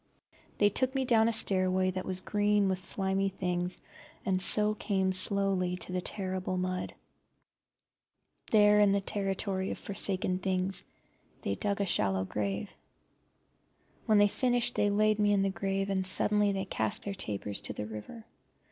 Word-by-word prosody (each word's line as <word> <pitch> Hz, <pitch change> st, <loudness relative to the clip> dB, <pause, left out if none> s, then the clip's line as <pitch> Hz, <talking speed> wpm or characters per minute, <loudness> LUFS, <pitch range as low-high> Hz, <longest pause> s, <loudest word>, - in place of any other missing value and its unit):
They 205 Hz, -, +4 dB
took 260 Hz, +5 st, -1 dB
me 265 Hz, -1 st, 0 dB
down 225 Hz, -2 st, +4 dB
a -, -, +2 dB
stairway 185 Hz, -3 st, +2 dB
that 185 Hz, 0 st, -5 dB
was 185 Hz, -1 st, -1 dB
green 205 Hz, 0 st, +1 dB
with 185 Hz, -1 st, -1 dB
slimy 195 Hz, +1 st, -1 dB
things, 180 Hz, -1 st, -2 dB, 0.4 s
and 185 Hz, -2 st, +1 dB
so 210 Hz, +2 st, +5 dB
came 190 Hz, -3 st, -1 dB
slowly 185 Hz, -1 st, +2 dB
to 180 Hz, -, -7 dB
the 180 Hz, 0 st, -2 dB
terrible 185 Hz, -1 st, -3 dB
mud. 185 Hz, 0 st, -3 dB, 1.5 s
There, 210 Hz, -1 st, +5 dB
in 205 Hz, -1 st, +4 dB
the 200 Hz, -, +1 dB
territory 195 Hz, -1 st, -2 dB
of -, -, -4 dB
forsaken 190 Hz, -2 st, -2 dB
things, 185 Hz, 0 st, +1 dB, 0.6 s
they 100 Hz, -, -1 dB
dug 200 Hz, -, -2 dB
a -, -, +1 dB
shallow 95 Hz, -, +1 dB
grave. 100 Hz, 0 st, -4 dB, 1.3 s
When 215 Hz, -, +4 dB
they 205 Hz, -, +6 dB
had 205 Hz, -, 0 dB
finished 245 Hz, -2 st, +1 dB
they 205 Hz, -, +1 dB
laid 215 Hz, +1 st, +2 dB
me 205 Hz, 0 st, +3 dB
in 195 Hz, -1 st, +2 dB
the 195 Hz, -, 0 dB
grave, 195 Hz, 0 st, -2 dB
and 190 Hz, -1 st, 0 dB
suddenly 205 Hz, +2 st, +2 dB
they 195 Hz, 0 st, -3 dB
cast 110 Hz, -, -2 dB
their 200 Hz, -, -4 dB
tapers 105 Hz, -, -4 dB
to -, -, -6 dB
the 105 Hz, -, -5 dB
river. 110 Hz, -, -9 dB
195 Hz, 165 wpm, -30 LUFS, 185-205 Hz, 1.5 s, they